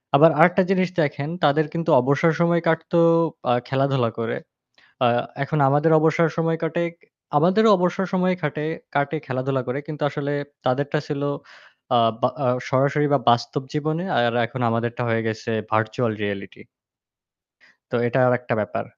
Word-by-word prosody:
আবার 160 +3 +7
আরেকটা 180 +3 +5
জিনিস 185 -2 +2
দেখেন, 145 0 -2
তাদের 150 +2 +3
কিন্তু 165 0 -3
অবসর 140 +5 +2
সময় 170 0 +2
কাটতো 160 +1 +1 0.5
আ - - +4
খেলাধুলা 135 -3 +1
করে। 115 0 -2 0.7
আ - - +5 0.4
এখন 155 +2 -2
আমাদের 145 +4 +2
অবসর 160 +1 +3
সময় 165 -1 0
কাটে। 170 +1 -1 0.5
আমাদেরও 195 +8 +4
অবসর 180 +1 0
সময় 185 0 +2
খাটে 150 0 -3 0.3
কাটে 145 +3 0
খেলাধুলা 130 0 -2
করে। 130 +3 -2
কিন্তু 150 -2 -7
আসলে 145 0 -4 0.3
তাদেরটা 145 +4 0
ছিল 145 -2 -4 0.7
আ - - +5 0.2
বা 125 - +2 0.2
আ - - +2 0.2
সরাসরি 140 +3 +2
বা - - +4
বাস্তব 120 +4 0
জীবনে 155 +4 -2
আর 120 -1 +2
এখন 125 +2 -8
আমাদেরটা 120 +1 -2
হয়ে 115 0 0
গেছে 110 +1 -5 0.2
ভার্চুয়াল 110 +1 0
রিয়েলিটি। 100 -2 -6 1.3
তো 125 - 0
এটা 120 +3 0
আরেকটা 125 -1 0
ব্যাপার। 105 - -3
145 Hz, 150 wpm, -22 LUFS, 125-165 Hz, 1.3 s, আবার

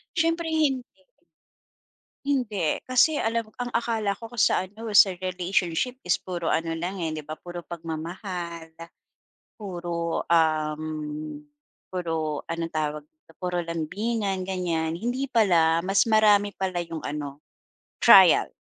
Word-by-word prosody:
Syempre 330 +1 +1
hindi. 290 -5 +1 1.4
Hindi. 220 - 0
Kasi 255 +5 +4
alam 225 -2 -1
ang 245 0 -4
akala 225 -3 0
ko 230 +3 -10
kasi 240 -2 +2
sa - - +2
ano, 210 +4 -11
sa 200 0 +8
relationship 185 +5 -1
is 180 - +1
puro 175 -3 -2
ano 165 0 -1
lang, 180 +3 -4
eh, 165 - -1
'di 155 - -7
ba, 155 - -5
puro 175 +2 -8
pagmamahal, 170 +1 -6 0.9
puro, 175 -4 -3
uhm, 155 -2 0 0.5
puro 165 -4 -3
anong 165 0 -4
tawag 150 -1 -2
dito, 155 +1 -25
puro 180 -1 -2
lambingan, 195 +4 -2
ganyan. 175 -4 -1
Hindi 240 +10 -2
pala, 170 -8 +4
mas 195 +3 +2
marami 210 -2 +4
pala 185 -3 -2
yung 165 -1 -6
ano, 145 -1 -5 0.6
trial. - - +7
175 Hz, 125 wpm, -26 LUFS, 160-215 Hz, 1.4 s, sa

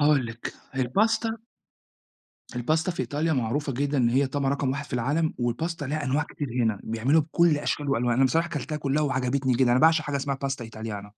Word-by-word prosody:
هاقول 145 -4 +4
لِك 115 +1 -7 0.2
الباستا 220 - +1 1.2
الباستا 160 +8 +1
في 170 - -4
إيطاليا 145 +6 -1
معروفة 135 +2 -1
جدًا 140 +3 0
إن 120 -2 +4
هي 135 +4 +2
طبعًا 135 0 -1
رقم 140 -1 0
1 140 +2 -3
في 140 - -14
العالم 145 +7 0
والباستا 145 +7 -2
لها 150 +2 -2
أنواع 140 +3 +1
كتير 145 -1 -6
هنا، 110 -3 0
بيعملوها 125 +8 +2
بكلّ 160 0 +3
أشكال 145 0 -2
وألوان، 120 -2 +1
أنا 135 +3 +4
بصراحة 165 +6 +2
كَلتها 150 0 -4
كلّها 145 0 0
وعجبتني 130 -1 0
جدًا، 125 0 +3
أنا 125 - +3
باعشق 160 0 +5
حاجة 145 -1 -2
اسمها 140 0 -2
pasta 135 -3 -3
italiana 110 -2 -7
140 Hz, 195 wpm, -26 LUFS, 125-150 Hz, 1.2 s, باعشق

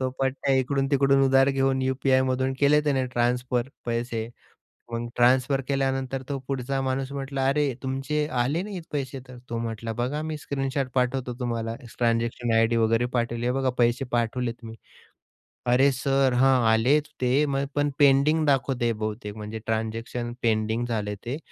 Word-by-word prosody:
तो 130 - 0
पठ्ठ्या 135 0 +1
इकडून-तिकडून 135 +1 +2
उधार 135 0 +4
घेऊन 135 -1 +1
यू-पी-आयमधून 130 0 +1
केले 145 +1 +5
त्याने 135 -3 +1
ट्रान्सफर 125 0 0 0.2
पैसे. 115 -1 -2 0.6
मग 115 0 -2
ट्रान्सफर 130 +3 +3
केल्यानंतर 135 -1 -1
तो 140 -1 -2
पुढचा 135 0 -2
माणूस 130 0 -2
म्हटला, 135 -1 -2
"अरे, 140 -1 +2
तुमचे 135 +3 -1
आले 145 +8 0
नाहीयेत 195 -3 -6
पैसे 135 -2 -3
तर." 125 - -10
तो 115 - -3
म्हटला, 115 0 -4
"बघा, 125 +7 -2
मी 155 -1 -4
स्क्रीनशॉट 135 -2 -2
पाठवतो 125 0 0
तुम्हाला. 115 -2 -2 0.2
ट्रान्झॅक्शन 115 0 0
आयडी 115 +1 +3
वगैरे 115 +1 +2
पाठवली. 120 -1 -1
हे 125 - +2
बघा, 135 -1 +1
पैसे 120 +2 +2
पाठवलेत 120 0 0
मी." 115 0 -8 1.0
"अरे 135 +3 +5
सर, 135 0 +1
हां, 130 -1 +5
आलेत 125 +7 +3 0.2
ते, 130 +4 +3
मय 140 -1 -1
पण 145 0 +2
पेंडिंग 145 +3 +4
दाखवते 130 -4 +1
बहुतेक." 105 -1 -5
म्हणजे 105 +1 -6
ट्रान्झॅक्शन 115 +2 -3
पेंडिंग 110 +1 +1
झाले 105 -3 -2
ते. 125 +4 -3
130 Hz, 150 wpm, -25 LUFS, 120-135 Hz, 1.0 s, केले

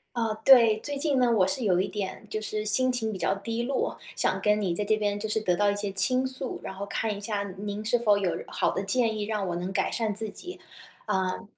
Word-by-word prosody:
啊， 225 -2 0
对。 235 -5 +7
最 285 +4 -4
近 280 -2 +1
呢， 245 -2 +3
我 205 -5 +4
是 240 +6 -1
有 185 -3 +3
一 190 - 0
点， 205 0 -5
就 215 - -2
是 215 0 -3
心 255 +5 +2
情 235 -3 -1
比 195 - -5
较 - - +1
低 230 +4 -3
落， 265 +1 -1 0.2
想 - - 0
跟 210 0 +2
你 185 -3 0
在 205 +5 -2
这 215 +1 +2
边， 205 -1 -1
就 220 +1 -4
是 215 +1 0
得 180 -4 +1
到 205 +1 +2
一 - - -3
些 205 -1 -3
倾 195 +7 +1
诉， 260 0 -1
然 - - -6
后 195 +1 -6
看 210 +1 -2
一 - - -7
下 205 -1 -2
您 205 +1 -5
是 245 +2 +2
否 215 -3 +3
有 195 -3 0 0.2
好 - - 0
的 195 - -3
建 225 +1 +1
议， 210 - -2
让 205 -2 -2
我 175 - -2
能 180 +2 -3
改 - - 0
善 220 -3 -1
自 215 +1 -2
己。 360 - -10 0.5
呃， 185 +3 -1
215 Hz, 275 characters per minute, -27 LUFS, 200-235 Hz, 0.5 s, 对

